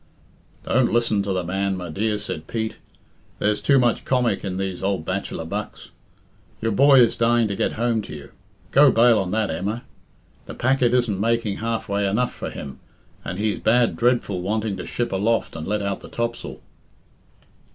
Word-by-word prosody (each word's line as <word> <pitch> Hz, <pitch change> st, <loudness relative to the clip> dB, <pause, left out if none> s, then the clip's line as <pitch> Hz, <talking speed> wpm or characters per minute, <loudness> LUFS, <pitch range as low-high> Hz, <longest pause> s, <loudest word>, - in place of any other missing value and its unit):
"Don't 130 Hz, 0 st, +2 dB
listen 115 Hz, -3 st, +2 dB
to 100 Hz, 0 st, -2 dB
the 95 Hz, -1 st, -1 dB
man, 95 Hz, +2 st, -1 dB
my 90 Hz, -1 st, -6 dB
dear," 105 Hz, +6 st, -1 dB
said 80 Hz, -6 st, -6 dB
Pete. 110 Hz, -1 st, -3 dB, 0.6 s
"There's 105 Hz, 0 st, 0 dB
too 140 Hz, -, +4 dB
much 120 Hz, -3 st, +2 dB
comic 125 Hz, -6 st, +1 dB
in 95 Hz, -2 st, -3 dB
these 95 Hz, -2 st, -3 dB
ould 95 Hz, -4 st, -1 dB
bachelor 95 Hz, -3 st, -3 dB
bucks. 100 Hz, +5 st, -6 dB, 0.7 s
Your 115 Hz, 0 st, -1 dB
boy 135 Hz, +4 st, +6 dB
is 120 Hz, -, +3 dB
dying 115 Hz, -1 st, +3 dB
to 100 Hz, -, -2 dB
get -, -, 0 dB
home 115 Hz, -1 st, 0 dB
to 100 Hz, -, -8 dB
you. 70 Hz, -1 st, -11 dB, 0.4 s
Go 145 Hz, +1 st, +7 dB
bail 115 Hz, -1 st, +5 dB
on 95 Hz, -2 st, -2 dB
that, 110 Hz, +2 st, 0 dB
Emma. 105 Hz, +6 st, -3 dB, 0.6 s
The -, -, -7 dB
packet 125 Hz, -1 st, +2 dB
isn't 115 Hz, -6 st, +1 dB
making 115 Hz, -1 st, 0 dB
half 115 Hz, 0 st, -3 dB
way 100 Hz, 0 st, 0 dB
enough 115 Hz, +6 st, 0 dB
for -, -, -5 dB
him, 70 Hz, -3 st, -8 dB, 0.4 s
and 90 Hz, -, -5 dB
he's 105 Hz, 0 st, -1 dB
bad 120 Hz, +1 st, +3 dB
dreadful 120 Hz, -6 st, +1 dB
wanting 105 Hz, +2 st, -1 dB
to 90 Hz, -, -7 dB
ship 120 Hz, -, -2 dB
aloft 105 Hz, +2 st, 0 dB
and 80 Hz, -1 st, -6 dB
let 105 Hz, 0 st, -1 dB
out 100 Hz, -1 st, -2 dB
the -, -, -12 dB
topsail." 115 Hz, 0 st, -4 dB
105 Hz, 185 wpm, -23 LUFS, 95-120 Hz, 0.7 s, Go